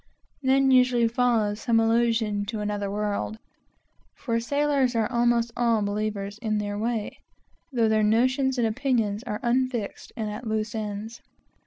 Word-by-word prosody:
Then 270 0 +3
usually 250 -2 +4
follows 225 -3 +1
some 230 -2 +2
allusion 225 -2 +1
to 215 +1 -4
another 205 -1 -2
world, 210 +1 -2 0.8
for 230 -3 -1
sailors 280 0 +1
are 225 -1 +2
almost 235 -1 +2
all 235 -3 +2
believers; 205 0 -3
but 215 -2 0
their 220 +2 -2
notions 255 +5 +2
and 240 - +2
opinions 225 -3 0
are 210 -3 -4
unfixed 245 -3 -1
and 220 -2 -2
at 220 +3 -7
loose 215 0 -2
ends. 215 +1 -5
225 Hz, 130 wpm, -26 LUFS, 210-245 Hz, 0.8 s, usually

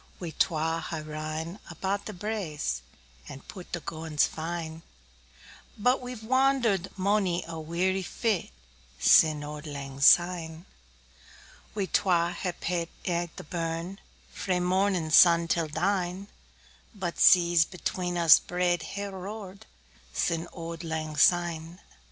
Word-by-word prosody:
We 175 -3 -5
twa 165 0 0
hae 160 -2 -4
rin 155 +4 -5
about 190 +4 -3
the - - -4
braes, 175 - -3 0.5
5 - - -9
And 135 - -11
pu'd 185 -2 -10
the 175 - -3
gowans 160 -2 0
fine; 160 0 -5 1.0
But 250 +5 +2
we've 245 -3 -7
wander'd 255 -5 +2
monie 190 -3 +1
a 165 -1 -6
weary 180 +4 -1
fit 210 +1 -1 0.5
Sin' 150 - +5
auld 150 +1 -7
lang 140 -2 -7
syne. 170 +1 +4 1.1
We 200 -2 0
twa 175 -3 +2
hae 180 0 -3
paidl't 170 -1 -3 0.2
i' 175 -1 -1
the - - -8
burn, 165 +3 -4 0.3
Frae 180 -1 -1
mornin' 180 -2 +1
sun 170 0 +7
till 165 -1 0
dine; 180 +3 -1 0.7
10 - - -26
But 180 -4 -4
seas 175 -2 +6
between 180 -1 -3
us 165 -3 +7
braid 175 -1 0
hae 200 +6 -5
roar'd 200 +1 -8 0.5
Sin' 170 0 -1
auld 165 0 -7
lang 160 -2 -4
syne. 170 +1 +2
175 Hz, 130 wpm, -28 LUFS, 160-190 Hz, 1.1 s, sun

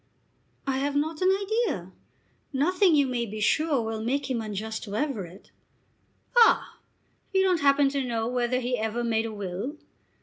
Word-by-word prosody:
"I 265 -1 0
have 285 +1 -1
not 310 +3 -1
an 370 - +4
idea. 390 - 0 0.6
Nothing 350 +5 +3
you 285 -2 +4
may 245 -2 -2
be 215 +1 -6
sure 285 +4 +2
will 220 0 -3
make 270 +3 -1
him 235 -3 -1
unjust 220 +1 -4
to 205 -1 -6
Everett." 205 - -4 0.8
"Ah! 470 -2 +4 0.6
You 380 - +5
don't 365 -4 +2
happen 280 0 +4
to 275 -1 -1
know 230 -2 -2
whether 250 0 0
he 250 -1 -1
ever 220 +2 -2
made 225 -1 0
a - - -6
will?" 205 - -5
255 Hz, 165 wpm, -27 LUFS, 220-295 Hz, 0.8 s, You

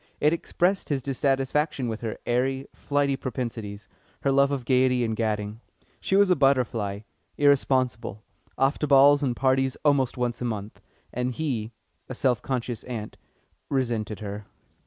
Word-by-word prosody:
It 150 +2 +3
expressed 180 +3 0
his 140 -3 -1
dissatisfaction 135 +1 0
with 110 -1 -4
her 110 -2 -4
airy, 130 +2 0
flighty 145 -1 0
propensities, 115 -6 -5 0.4
her 140 - +2
love 140 +1 +4
of 135 -4 -3
gaiety 125 -1 +3
and 110 -1 -1
gadding. 105 0 -2 0.4
She 190 - 0
was 200 -1 +5
a - - +6
butterfly, 120 -8 +1 0.4
irresponsible, 130 -6 +1 0.3
off 135 +2 +2
to 150 - 0
balls 140 +1 +6
and 130 -4 0
parties 130 +1 +1
almost 135 -4 +2
once 125 -1 -2
a - - -1
month, 105 -3 -5 0.3
and 125 +1 -1
he, 120 -7 -2 0.4
a 130 - -5
self 125 -3 +1
conscious 125 -3 -3
ant, 110 -4 -6 0.5
resented 115 -6 -1
her. 105 0 -6
130 Hz, 150 wpm, -26 LUFS, 115-140 Hz, 0.5 s, a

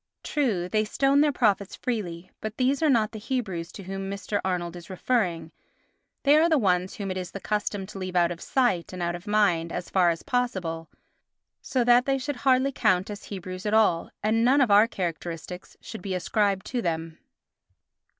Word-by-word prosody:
True, 225 - 0
they 215 +3 +1
stoned 275 +6 +3
their 300 - +3
prophets 205 -7 +1
freely; 185 -7 -4
but 215 0 -5
these 265 +4 +1
are 315 - +3
not 225 -5 +3
the 220 - -7
Hebrews 205 -9 -3
to 200 - -9
whom 195 +1 -5
Mr. 200 +1 -3
Arnold 180 -2 -2
is 175 +1 -11
referring, 180 -5 -1 0.7
they 285 +1 +6
are 325 +2 +4
the 315 - +4
ones 185 -4 +1
whom 200 -5 -4
it 185 - -3
is 180 -1 -4
the 200 - -7
custom 205 -1 -2
to 195 0 -9
leave 185 -1 -5
out 175 -1 +3
of 170 - -7
sight 240 -11 0
and 180 -1 -4
out 170 0 -1
of 175 +4 -8
mind 185 -6 +2
as 175 - -5
far 180 -2 +4
as 165 -1 -2
possible, 185 -10 -2 0.7
so 260 -2 0
that 245 +2 +5
they 270 0 +2
should 270 +1 -4
hardly 260 +1 +3
count 185 -5 +1
as 205 - -8
Hebrews 185 0 -6
at 210 - +2
all, 210 -7 +3
and 220 +2 +2
none 260 +4 +4
of 255 -6 +3
our 205 +2 +7
characteristics 175 -3 -5
should - - -8
be 190 0 -3
ascribed 195 +2 0
to 250 -2 -2
them. 165 -3 -3
200 Hz, 200 wpm, -26 LUFS, 180-240 Hz, 0.7 s, our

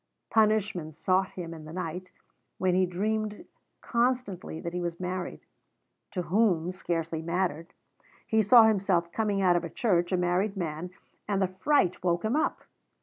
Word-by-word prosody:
Punishment 210 -8 +1
sought 190 +2 +2
him 170 -2 -6
in 160 -2 -10
the 155 - -9
night, 180 +1 -5 0.5
when 185 -1 +1
he 185 0 +3
dreamed 210 +3 -2 0.4
constantly 235 -9 -1
that 170 - -5
he 180 - -2
was 170 -1 -4
married 185 0 -4 0.7
to 180 - -3
whom 180 -3 +2
scarcely 165 -3 -3
mattered; 170 0 -2 0.5
he 220 0 +2
saw 225 +3 +8
himself 190 -6 +2
coming 205 -2 0
out 180 -1 +5
of 175 - +1
a 170 - -4
church 175 -5 +1
a 185 - +2
married 180 +3 0
man, 165 0 -3 0.4
and 200 -2 0
the 190 - +2
fright 185 - +1
woke 175 +1 +1
him 220 +5 +1
up. 310 - 0
185 Hz, 160 wpm, -28 LUFS, 170-210 Hz, 0.7 s, saw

